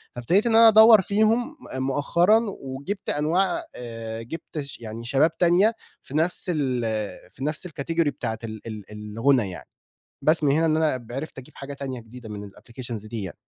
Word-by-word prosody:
فابتديت 175 - +2
إن 230 -1 +2
أنا 230 0 +9
أدوّر 220 -1 +8
فيهم 220 - +1 0.2
م - - -1
مؤخرًا 170 +10 +3 0.2
وجِبت 140 +10 -5
أنواع 175 +6 +1
آآ، 115 -2 -6
جِبت 155 +5 -7
ش 140 -1 -7
يعني 115 0 -7
شباب 140 +6 +2
تانية 185 +6 +4 0.3
في 145 - -5
نفس 165 +3 0
ال 130 -5 0 0.5
في 135 - -9
نفس 150 +4 -2
الcategory 165 +1 -1
بتاعة 110 -5 -4
ال 110 -2 -6
ال 110 -3 -7 0.3
الغُنى 125 -4 +3
يعني، 90 - -10 0.5
بس 155 +3 +3
من 140 - +4
هنا 160 +3 +3
إن 155 - +2
أنا 140 -7 0
عرفت 150 +1 -6
أجيب 130 - -14
حاجة 140 +1 -7
تانية 135 -3 -6
جديدة 115 0 -12
من 105 -1 -7
الapplications 115 0 -8
دي 115 -3 -4
يعني. 95 - -7
140 Hz, 180 wpm, -24 LUFS, 120-170 Hz, 0.5 s, أنا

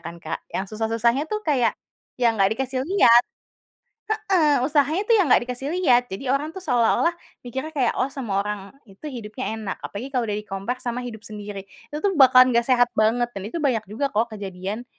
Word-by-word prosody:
kan 170 +1 -7
Kak, 155 - -4
yang 190 - -1
susah-susahnya 230 +5 0
tuh 425 0 -1
kayak, 255 -6 +2 0.5
ya 240 - +5
enggak 195 0 +2
dikasih 265 -1 -2
lihat. 245 -11 +6 0.9
Heeh, 375 - +2
usahanya 300 +6 +2
tuh 460 - +5
yang 360 - +3
nggak - - +5
dikasih 260 +3 -5
lihat, 245 -9 +3
jadi 255 +7 -3
orang 295 +3 -2
itu 380 - -6
seolah-olah 250 +4 +2 0.3
mikirnya 265 +6 -5
kayak, 255 -4 +2
"Oh 260 - +2
semua 225 -8 -2
orang 210 0 -3 0.3
itu 195 +8 -19
hidupnya 235 -1 -5
enak," 210 -4 -5
apalagi 215 +6 -6
kalau 250 -2 +1
udah 205 - -1
di 210 - -11
compare 200 +6 -4
sama 245 0 -3
hidup 220 -3 -7
sendiri. 205 -2 -7 0.3
Itu 300 - -4
tuh 400 - +2
bakalan 255 -1 +7
nggak 235 0 +3
sehat 245 -1 +5
banget 235 +3 +2
dan 195 - -5
itu 280 +11 -4
banyak 255 -7 +1
juga 235 +7 -1
kok 225 +2 0
kejadian 200 +3 -6
245 Hz, 195 wpm, -23 LUFS, 215-275 Hz, 0.9 s, bakalan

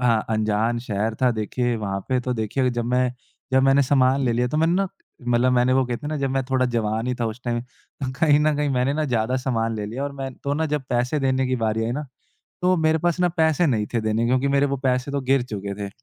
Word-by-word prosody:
हाँ, 115 -3 +2
अंजान 110 +2 +1
शहर 110 -1 -2
था 125 - +5
देखिए 120 +3 -1
वहाँ 100 -2 -3
पे 130 -1 +2
तो 125 0 -2
देखिए 125 +4 0
जब 120 -1 -2
मैं 125 +1 +1 0.4
जब 130 0 +4
मैंने 135 +1 +5
सामान 135 0 +3
ले 120 - +2
लिया 120 +1 +1
तो 150 - -2
मैंने 165 +2 +3
ना 195 +1 +1 0.4
मतलब 120 +1 +3
मैंने 125 +1 +3
वो 130 0 +3
कहते 125 +4 -4
है - - -2
ना, 155 - -2
जब 135 -2 -1
मैं 135 0 0
थोड़ा 130 -1 +2
जवान 115 -1 -1
ही 125 - 0
था 115 - +1
उस 110 +3 -6
टाइम 120 -1 -1
तो 130 +1 -9
कहीं 150 -3 +5
न - - +2
कहीं 155 -1 +3
ना 150 - 0
एक 145 - 0
मैंने 125 +2 +1
ना 155 0 0
ज़्यादा 120 -1 0
सामान 115 -3 -1
ले 105 - -3
लिया 120 +6 -5
और 145 - -4
मैं 135 -1 -5
तो 140 0 -3
ना 160 +1 0
जब 150 -2 -1
पैसे 125 +5 +1
देने 130 -1 +1
की 130 0 0
बारी 110 -1 0
आई 115 - -1
ना 145 +2 -4 0.6
तो 185 0 +3
मेरे 160 0 +2
पास 175 0 +2
ना 180 - +4
पैसे 160 +1 +3
नहीं 110 -6 +1
थे 115 - +2
देने 110 +1 0
के - - +1
क्योंकि 130 +2 +2
मेरे 140 +1 +3
वो 140 0 -1
पैसे 130 +1 0
तो 140 0 -1
गिर 135 0 +2
चुके 100 -4 -5
थे। 100 0 -5
125 Hz, 275 wpm, -23 LUFS, 115-140 Hz, 0.6 s, था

